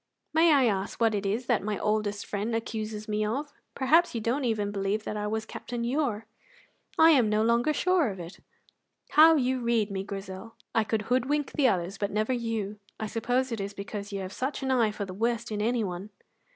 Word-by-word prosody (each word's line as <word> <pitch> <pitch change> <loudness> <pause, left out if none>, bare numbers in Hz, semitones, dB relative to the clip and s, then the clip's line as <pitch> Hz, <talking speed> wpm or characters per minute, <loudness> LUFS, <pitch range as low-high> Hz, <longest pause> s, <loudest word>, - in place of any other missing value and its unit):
"May 325 +1 +5
I 275 -4 +5
ask 200 -3 -1
what 225 -2 +3
it 200 -1 -1
is 225 +6 -1
that 240 -3 +2
my 210 0 -2
oldest 210 -1 -1
friend 215 +3 -2
accuses 215 -1 -4
me 215 0 0
of? 275 +7 -3 0.2
Perhaps 310 +4 +3
you - - 0
don't 245 +5 -1
even 210 -3 0
believe 200 +1 -1
that 215 - -4
I 210 0 -2
was 220 +1 -2
Captain 240 +1 -5
Ure?" 240 -4 -1 0.7
"I 325 +1 +8
am 250 -8 +4
no 215 +1 +2
longer 235 +5 +3
sure 355 -2 +2
of 190 -2 -7
it." 170 +1 -9 0.7
"How 320 +2 +8
you 260 -2 +1
read 235 -3 +1
me, 190 -1 -2
Grizel! 195 +2 -7 0.2
I 225 -1 +2
could 220 -1 -1
hoodwink 265 +5 0
the 280 -3 +3
others, 185 -2 -1
but 200 - 0
never 215 +5 0
you. 225 -4 -3 0.2
I 220 - -2
suppose 245 +4 -1
it 225 -3 -2
is 200 +1 -5
because 200 +1 -6
you 200 -1 -3
have 190 +1 -6
such 270 +4 -3
an 265 - 0
eye 235 -4 +3
for 205 -1 -4
the 185 - -8
worst 235 +3 -1
in 210 -1 -2
anyone." 210 -4 -1
220 Hz, 210 wpm, -28 LUFS, 205-250 Hz, 0.7 s, I